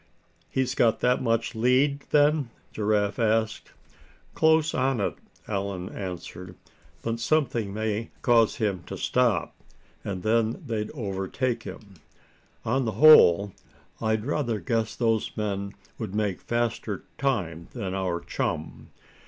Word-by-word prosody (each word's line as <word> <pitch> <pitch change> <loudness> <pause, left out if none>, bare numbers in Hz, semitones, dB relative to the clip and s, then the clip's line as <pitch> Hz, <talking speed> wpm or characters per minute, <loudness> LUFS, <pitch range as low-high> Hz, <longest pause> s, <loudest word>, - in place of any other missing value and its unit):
"He's 130 -1 0
got 115 -3 +3
that 125 +1 +2
much 115 -1 0
lead, 130 +5 +2
then?" 145 -2 +3 0.2
Giraffe 105 0 0
asked. 110 -1 0 0.6
"Close 160 0 +3
on 130 -1 +1
it," 100 - -1 0.3
Allan 95 -3 -3
answered. 90 -1 -7 0.5
"But 115 0 -2
something 120 -8 +1
may 110 +1 -2
cause 115 -3 +4
him 105 -8 -1
to - - -6
stop, - - +1 0.5
and 95 -3 -4
then 115 +7 +1
they'd 110 -4 -2
overtake 110 +2 -2
him. 100 -4 -10 0.7
On 130 +3 +1
the 110 - -1
whole, 100 - +7 0.5
I'd 110 -1 0
rather 125 -6 -1
guess 115 -3 -1
those 115 -3 0
men 100 -2 -2 0.3
would 105 -3 -5
make 105 -3 -1
faster 120 -1 -2 0.2
time 90 - -1
than 100 -7 -4
our 90 -3 -1
chum." 80 -1 -4
110 Hz, 125 wpm, -26 LUFS, 100-125 Hz, 0.7 s, whole